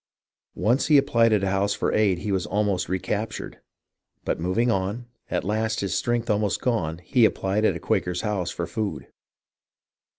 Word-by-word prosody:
Once 120 +8 +1
when - - +4
he - - +9
applied 115 -5 +3
at 105 -2 +2
a 95 - +1
house 100 +1 +1
for - - -1
aid 100 -4 +3
he 100 +4 -4
was 95 -2 0
almost 100 -2 0
recaptured. 105 +4 -3 0.7
But - - -1
moving 95 +8 +1
on, 100 +5 -2 0.2
at 90 - -1
last 110 +3 -1
his 100 - -2
strength 120 -1 0
almost 105 -1 +1
gone, 85 -11 -1
he 120 +8 +2
applied 105 0 +2
at - - +2
a - - -5
Quaker's 90 0 -1
house 100 -5 -1
for 85 - -3
food. 100 - -4
105 Hz, 175 wpm, -25 LUFS, 95-110 Hz, 0.7 s, he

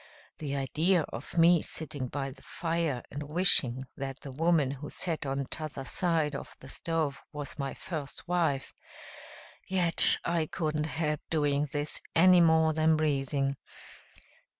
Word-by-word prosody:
The 140 -2 -4
idea 160 +6 +1
of 120 +8 -8
me 170 0 +5
sitting 145 -4 -4
by 135 +1 -4
the 130 - -16
fire 165 -7 -3
and 145 - -6
wishing 145 -5 +3
that 135 0 -6
the 140 - -8
woman 155 -1 +1
who 140 +1 -7
sat 165 -5 -2
on 135 0 -2
the 140 - -2
t'other 140 -1 -5
side 160 0 0
of 140 - -8
the 135 - -12
stove 160 -4 -3
was 145 -1 -7
my 140 -1 -3
first 155 -1 -7
wife! 165 -6 -1 0.9
Yet 180 -3 +7
I 170 -2 0
couldn't 155 -2 -2
help 150 -1 -2
doing 145 -2 0
this 145 0 -3
any 180 +1 +6
more 160 -1 +4
than 160 0 +2
breathing. 140 -2 -1
150 Hz, 150 wpm, -29 LUFS, 140-165 Hz, 0.9 s, Yet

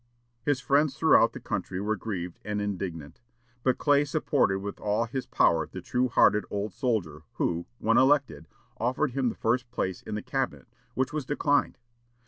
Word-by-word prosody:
His 140 +2 +1
friends 140 +2 +2
throughout 155 -7 +5
the - - -7
country 95 -3 -3
were 105 +2 0
grieved 90 -4 -5
and 105 0 -2
indignant. 95 -5 -5 0.4
But 130 0 +1
Clay 145 -1 +3
supported 145 -8 +1
with 100 +1 -6
all 105 +3 0
his 130 +3 -5
power 80 -2 +3
the 95 - -8
true 125 +7 0
hearted 105 -2 +4
old 100 0 -3
soldier, 100 - -1
who, 85 0 -1
when 115 0 +2
elected, 140 +1 +2 0.3
offered 130 +5 0
him 130 -1 0
the - - -6
first 120 +2 0
place 95 -6 -3
in - - -6
the 105 - -4
Cabinet, 135 -1 -3 0.3
which 130 +2 -1
was 155 -2 -2
declined. 145 0 +1
115 Hz, 170 wpm, -28 LUFS, 100-135 Hz, 0.4 s, throughout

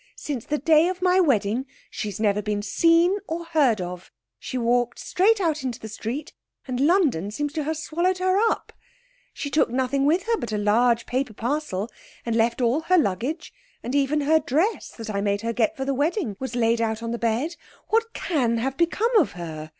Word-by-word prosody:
Since 270 -6 -5
the 300 - -1
day 315 +3 +4
of 365 0 -3
my 365 0 +4
wedding 250 - +1 0.2
she's 210 -3 -5
never 210 -1 +2
been 205 0 -2
seen 335 - +3
or 335 +1 -4
heard 290 - +2
of. 180 0 -6 0.3
She 255 - -5
walked 240 0 +1
straight 415 +4 +2
out 320 -5 0
into 250 -3 -4
the 220 - -8
street, 240 +8 -5 0.3
and 250 -1 -3
London 285 - +2
seems 290 +7 -3
to 310 -2 -2
have 315 +1 -2
swallowed 345 +4 0
her 370 0 +1 0.2
up. - - -5 0.6
She 285 - -6
took 300 - +3
nothing 260 +3 0
with 340 +5 +2
her 460 0 0
but 235 - -5
a 215 - -1
large 230 +3 +2
paper 255 -2 -2
parcel, 235 -4 -2 0.4
and 230 -1 -1
left 235 +2 +1
all 240 +5 +2
her 365 +3 +3
luggage, 285 - -1 0.3
and 245 - -4
even 285 +1 +2
her 315 +3 +4
dress 315 - 0
that 225 -2 -7
I 200 -1 -1
made 200 0 0
her 230 0 -2
get 225 -2 0
for 265 - -3
the 275 - 0
wedding 290 - -1
was 260 -2 -5
laid 230 -1 +2
out 220 0 -1
on 230 - -3
the 235 - -3
bed. 240 +9 -1 0.3
What 455 +1 +1
can 250 -9 0
have 265 +4 -2
become 420 +8 +1
of 320 - +1
her? 160 -3 -7
265 Hz, 205 wpm, -24 LUFS, 225-320 Hz, 0.6 s, day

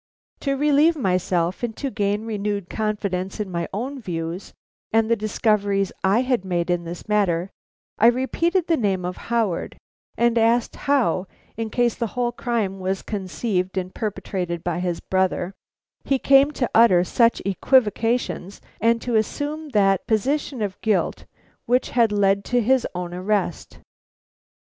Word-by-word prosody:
To 275 -1 -1
relieve 300 +3 +4
myself 180 - 0
and 235 -2 -3
to 275 -2 -3
gain 205 -1 -1
renewed 205 -3 -3
confidence 200 -3 -2
in 205 -3 -3
my 170 -1 -2
own 260 +7 -4
views 170 -1 -5 0.4
and 225 0 +2
the - - +5
discoveries 205 -2 0
I 195 +5 +3
had 250 -6 0
made 175 -2 -1
in 175 -1 -1
this 170 +4 -7
matter, 195 -4 +1 0.5
I 225 - +6
repeated 325 +9 +1
the 330 -2 +2
name 195 -5 0
of 180 0 -4
Howard, 225 -7 -1 0.4
and 235 0 +3
asked 230 +1 +2
how, 230 -10 +1 0.3
in 225 0 -3
case 240 +1 +1
the 235 - -2
whole 240 -1 +1
crime 225 -5 -2
was 190 +1 -2
conceived 190 -1 -2
and 185 0 -3
perpetrated 185 -5 -3
by 175 -1 -1
his 175 -2 -2
brother, 185 0 0 0.5
he 275 - +1
came 275 +2 +5
to 250 -4 -2
utter 205 -6 +6
such 230 +5 +2
equivocations 225 -1 +1 0.2
and 230 +1 +2
to 245 - -2
assume 295 +7 -2
that 195 -6 +2
position 260 +2 0
of 200 -1 -5
guilt 215 -3 0 0.4
which 250 +2 +1
had 235 -3 +3
led 200 -1 +2
to 245 - +1
his 255 +2 +2
own 175 -1 -4
arrest. 185 -1 -2
210 Hz, 150 wpm, -23 LUFS, 185-240 Hz, 0.5 s, I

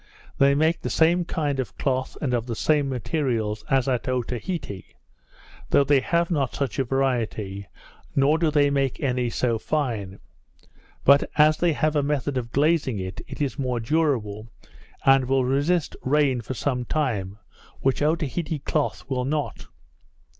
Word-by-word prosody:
They 140 0 +5
make 160 +3 +2
the - - -3
same 170 +2 +3
kind 145 -5 -2
of 120 -6 -4
cloth, 130 -1 -1
and 130 -4 -1
of 120 0 -1
the 115 - -3
same 145 +2 +1
materials, 120 -5 -2
as 135 -1 +2
at 130 0 -1
Otaheite; 125 - -4 0.7
though 140 - +5
they 140 0 +4
have 170 +5 0
not 140 -6 0
such 135 -5 -2
a - - +3
variety, 115 -7 -1 0.5
nor 145 +3 +3
do 165 -2 +2
they 145 -2 +3
make 135 -2 0
any 125 -3 0
so 115 -1 0
fine; 110 -10 -2 0.9
but, 140 +1 +5
as 155 +1 +5
they 175 -2 +2
have 155 +1 0
a 145 - +3
method 140 -1 -1
of 120 -2 -3
glazing 145 -5 +2
it, 95 -1 -5
it - - -4
is 140 0 -3
more 125 -3 -1
durable, 115 -6 0 0.6
and 135 -1 +5
will 130 0 +2
resist 145 +6 +1
rain 135 -2 +2
for 130 +3 -6
some 125 -1 -1
time, 110 -9 -2 0.4
which 135 +1 +1
Otaheite 155 0 -1
cloth 150 -2 -1
will 130 -2 -1
not. 150 +1 -3
135 Hz, 160 wpm, -24 LUFS, 125-150 Hz, 0.9 s, They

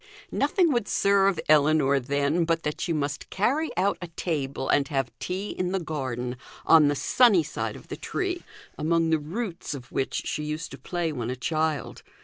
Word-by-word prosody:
Nothing 355 -6 +2
would 235 -4 0
serve 195 -2 +3
Ellinor, 150 -2 +4
then, 140 +5 +1
but 165 0 0
that 150 - -3
she 175 - -1
must 145 -3 -2
carry 275 +11 +1
out 195 +2 +1
a 175 - -5
table 140 -6 -3
and 140 -1 +3
have 135 -5 -1
tea 190 +3 -3
in 180 0 -2
the 195 - +1
garden, 130 -6 -4 0.3
on 160 -3 +7
the 145 - +1
sunny 195 - +4
side - - -4
of - - -12
the - - -5
tree, 365 -1 -2 0.4
among 165 +1 +2
the 160 - +3
roots 170 +1 -4
of 125 -3 -10
which 135 - -1
she 150 - -2
used 155 +2 -4
to 135 - -9
play 170 +4 -2
when 120 -5 -4
a 125 - -2
child. 155 +2 -2
155 Hz, 185 wpm, -26 LUFS, 140-185 Hz, 0.4 s, on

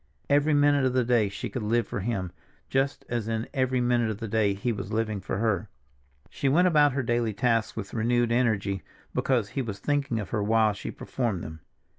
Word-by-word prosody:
Every 145 +1 +4
minute 145 -1 +4
of 130 -1 +2
the 130 -1 +3
day 115 -4 +3
she 100 +5 -5
could 120 +3 -5
live 115 +2 +1
for - - -4
him, 95 -4 -2 0.4
just 135 +1 0
as 120 -3 -2
in 115 0 -2
every 130 -2 +1
minute 120 -2 +2
of 110 - -3
the 115 - -5
day 105 -2 +1
he 110 +5 -1
was 105 -2 -5
living 110 -2 -1
for 95 - -3
her. 105 -4 0 0.6
She 140 - 0
went 175 +7 +4
about 150 -5 +4
her 130 -1 -1
daily 120 -2 0
tasks 115 +1 +1
with 100 -4 -6
renewed 120 +1 +1
energy, 105 -5 +1 0.3
because 120 -6 +1
he 135 - -2
was 110 -5 -4
thinking 135 -1 -1
of 105 - -5
her 110 - 0
while 110 0 +3
she - - -6
performed 115 -9 -3
them. 80 +1 -8
115 Hz, 210 wpm, -27 LUFS, 105-130 Hz, 0.6 s, Every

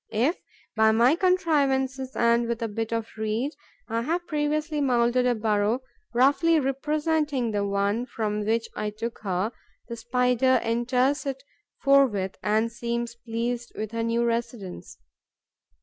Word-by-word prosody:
If, 250 - +1 0.4
by 220 0 +5
my 240 +6 +5
contrivances 275 -8 +1
and 235 0 +3
with 235 0 -2
a - - 0
bit 225 +1 -4
of 230 -1 -1
reed, 220 +6 -1 0.4
I 230 0 -1
have 340 +8 -1
previously 300 0 -1
moulded 250 -1 +2
a 245 - +2
burrow 215 +2 +1 0.3
roughly 285 +7 +4
representing 295 -1 0
the 205 -1 0
one 200 +4 0
from 210 -3 -2
which 225 +2 0
I 210 - -2
took 225 +3 -6
her, 195 +1 -1 0.4
the 235 - -4
Spider 250 +2 +2
enters 250 +5 +1
it 270 0 -4 0.4
forthwith 255 -9 +3
and 220 +2 +1
seems 235 0 -3
pleased 235 +1 -4
with 215 0 -4
her 230 0 -2
new 230 +1 +1
residence. 230 - -4
235 Hz, 140 wpm, -26 LUFS, 225-270 Hz, 0.4 s, by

